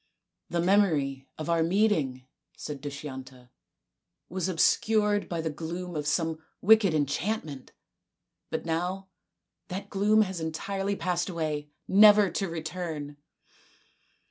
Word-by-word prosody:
" - - -57
The 170 - 0
memory 155 -9 +2
of 155 - -5
our 170 -1 +2
meeting," 160 -8 +1 0.3
said 145 -2 -6
Dushyanta, 130 -3 -8 0.4
" - - -57
was 185 0 -2
obscured 210 +4 +2
by 170 -2 -2
the 160 -1 -2
gloom 170 +3 -6
of 150 -1 -3
some 160 0 0 0.2
wicked 205 -4 +5
en 145 -2 +3
chantment. 150 -2 -3 0.8
But - - -3
now 180 +4 -2 0.6
that 195 0 -6
gloom 210 +2 +4
has 190 -3 -5
entirely 195 +5 -2
passed 175 0 -1
away 155 -4 -3 0.2
never 210 0 +7
to 195 -3 -2
return." 160 -3 -5
170 Hz, 125 wpm, -28 LUFS, 150-195 Hz, 0.8 s, never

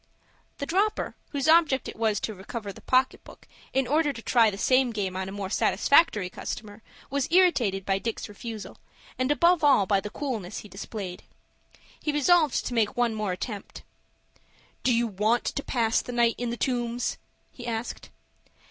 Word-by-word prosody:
The 280 - -3
"dropper," 395 +7 0 0.2
whose 280 0 -2
object 315 -4 +4
it - - -7
was 220 -2 +1
to 220 - -3
recover 205 +1 -7
the - - -14
pocket 255 0 +1
book, - - -15 0.2
in 265 0 +1
order 295 +3 +2
to 235 -4 -9
try 230 -3 +4
the 195 - -6
same 255 +4 +3
game 200 -5 -3
on 190 0 -3
a - - -7
more 195 -1 -5
satisfactory 210 - +3
customer, 205 +3 -7 0.3
was 280 -1 0
irritated 245 - +3
by 195 0 +1
Dick's 230 +2 -4
refusal, 215 +1 -8 0.4
and 255 +2 +1
above 340 +2 +3
all 275 -9 +5
by 195 +1 +2
the 210 - -6
coolness 220 -7 -4
he - - -9
displayed. 195 -1 -7 0.8
He 300 - 0
resolved 300 0 +3
to - - -3
make 225 -2 +1
one 240 -2 +2
more 215 -3 -2
attempt. 205 +2 -7 1.0
"Do 255 - +2
you 235 0 +2
want 215 +3 +1
to 280 - -2
pass 230 -3 +1
the - - -7
night 235 -1 +3
in 245 -1 -2
the 235 - -3
Tombs?" 240 -1 -1 0.3
he 240 -2 -9
asked. 230 0 -4
235 Hz, 175 wpm, -27 LUFS, 205-270 Hz, 1.0 s, all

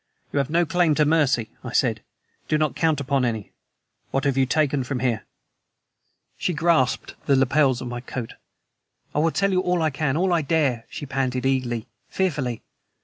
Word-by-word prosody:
"You 145 - +2
have 140 0 0
no 170 +2 +3
claim 170 -1 +2
to 150 - +3
mercy," 145 -7 +2
I - - -6
said. - - +2 0.5
"Do 155 - +2
not 155 -1 0
count 160 -3 +1
upon 140 -1 0
any. 110 -4 -2 0.6
What 135 - -1
have 140 -2 +1
you 135 -1 +2
taken 145 -1 +1
from 130 +1 -3
here?" 120 -4 -1 1.1
She 180 - 0
grasped 160 -5 +1
the 140 - +5
lapels 135 -1 +3
of 125 - -5
my 120 0 -5
coat. 125 -2 -6 0.8
"I - - +1
will 165 +2 +3
tell 195 +4 +1
you 185 - +2
all 180 -2 +1
I 155 - +2
can 140 0 -1
all 180 +1 +2
I 170 - +3
dare," 140 -6 0
she - - -6
panted 130 -2 -1
eagerly, 125 -4 0 0.2
fearfully. 145 - -1
140 Hz, 185 wpm, -24 LUFS, 130-160 Hz, 1.1 s, the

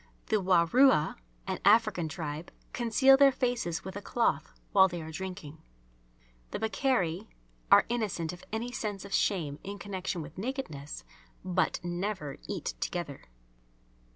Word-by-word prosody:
The 220 - +3
Warua, 180 - +4 0.3
an - - -3
African 205 -5 +4
tribe, 155 -1 -5 0.2
conceal 265 +3 +5
their 275 0 +7
faces 245 -9 -1
with 190 0 -6
a 205 - -5
cloth 235 +3 0 0.2
while 190 -1 +7
they 175 -2 -5
are 160 0 -7
drinking. 160 -3 -7 0.9
The - - -3
Bakairi 215 - 0 0.4
are - - +8
innocent 205 -8 -2
of 180 - -12
any 230 +3 -3
sense 210 -5 -4
of 200 - -8
shame 155 -8 0
in 200 +1 -6
connection 190 -4 -4
with 150 +4 -10
nakedness, 170 - -5 0.4
but 180 -1 +1
never 175 -4 -3
eat - - -3
together. 160 - -4
190 Hz, 135 wpm, -30 LUFS, 165-220 Hz, 0.9 s, are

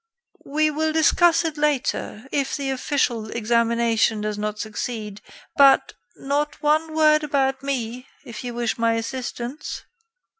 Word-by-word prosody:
"We 310 +2 +1
will 315 +1 0
discuss 330 +1 +4
it 315 -2 -3
later 275 -5 -1
if 275 -2 -1
the 275 -2 -2
official 250 -4 -1
examination 230 -1 +1
does 210 0 -2
not 210 0 -3
succeed. 215 -1 -5 0.3
But, 275 -1 +5 0.2
not 290 +2 -2
one 310 +1 +1
word 305 -1 +4
about 270 -2 0
me, 255 -2 -4 0.2
if 230 -1 -8
you 245 -1 -5
wish 240 +1 -2
my 230 0 +2
assistance." 245 +3 -5
265 Hz, 135 wpm, -23 LUFS, 230-295 Hz, 0.3 s, But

